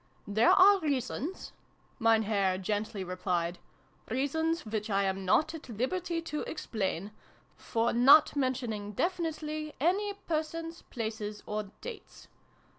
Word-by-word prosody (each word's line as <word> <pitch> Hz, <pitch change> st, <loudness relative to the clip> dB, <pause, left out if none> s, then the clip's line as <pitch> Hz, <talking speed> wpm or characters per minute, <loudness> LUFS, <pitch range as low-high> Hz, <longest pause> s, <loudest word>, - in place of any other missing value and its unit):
"There 220 Hz, +3 st, +4 dB
are 395 Hz, +1 st, +7 dB
reasons," 290 Hz, +3 st, -3 dB, 0.5 s
Mein 225 Hz, -1 st, +4 dB
Herr 200 Hz, -3 st, +1 dB
gently 205 Hz, +1 st, -2 dB
replied, 180 Hz, -1 st, -2 dB, 0.3 s
" 150 Hz, 0 st, -28 dB
reasons 320 Hz, +6 st, 0 dB
which 215 Hz, 0 st, -3 dB
I 200 Hz, -1 st, +2 dB
am 190 Hz, 0 st, -1 dB
not 310 Hz, -, +3 dB
at 315 Hz, -5 st, -9 dB
liberty 330 Hz, -, -2 dB
to 300 Hz, -2 st, -3 dB
explain, 205 Hz, -, -3 dB, 0.4 s
for 230 Hz, +1 st, -1 dB
not 270 Hz, +7 st, +7 dB
mentioning 240 Hz, -6 st, -2 dB
definitely 310 Hz, -, -2 dB
any 395 Hz, +7 st, +1 dB
Persons, 330 Hz, -2 st, -4 dB
Places, 220 Hz, -2 st, -4 dB
or 210 Hz, -1 st, -3 dB
Dates. 470 Hz, -3 st, -9 dB
245 Hz, 120 wpm, -30 LUFS, 205-320 Hz, 0.5 s, are